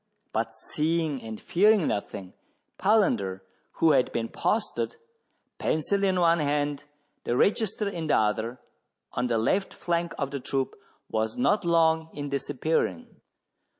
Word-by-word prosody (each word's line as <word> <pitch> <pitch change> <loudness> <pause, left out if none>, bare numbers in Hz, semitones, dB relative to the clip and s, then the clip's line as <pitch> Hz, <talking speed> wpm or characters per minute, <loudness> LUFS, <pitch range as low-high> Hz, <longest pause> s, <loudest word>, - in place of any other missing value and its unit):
But 115 +1 -1
seeing 155 -3 -1
and 110 -1 -7
fearing 205 0 +3
nothing, 100 -2 -4 0.5
Palander, 120 - +2 0.3
who 165 - +4
had 130 -3 +3
been 115 -1 -2
posted, 225 - -1 0.6
pencil 200 +6 0
in 190 -2 +2
one 170 -1 +4
hand, 145 -1 0 0.4
the 120 - 0
register 210 - +1
in 170 -5 -3
the - - +4
other, 110 +3 0 0.6
on 125 0 0
the 115 -2 +1
left 190 - 0
flank 170 -1 -1
of 140 -1 -2
the 140 - -3
troop, 135 +1 -2 0.3
was 110 0 -1
not 215 -6 +2
long 160 -1 +3
in 145 -1 -4
disappearing. 140 - -2
150 Hz, 135 wpm, -27 LUFS, 120-175 Hz, 0.6 s, who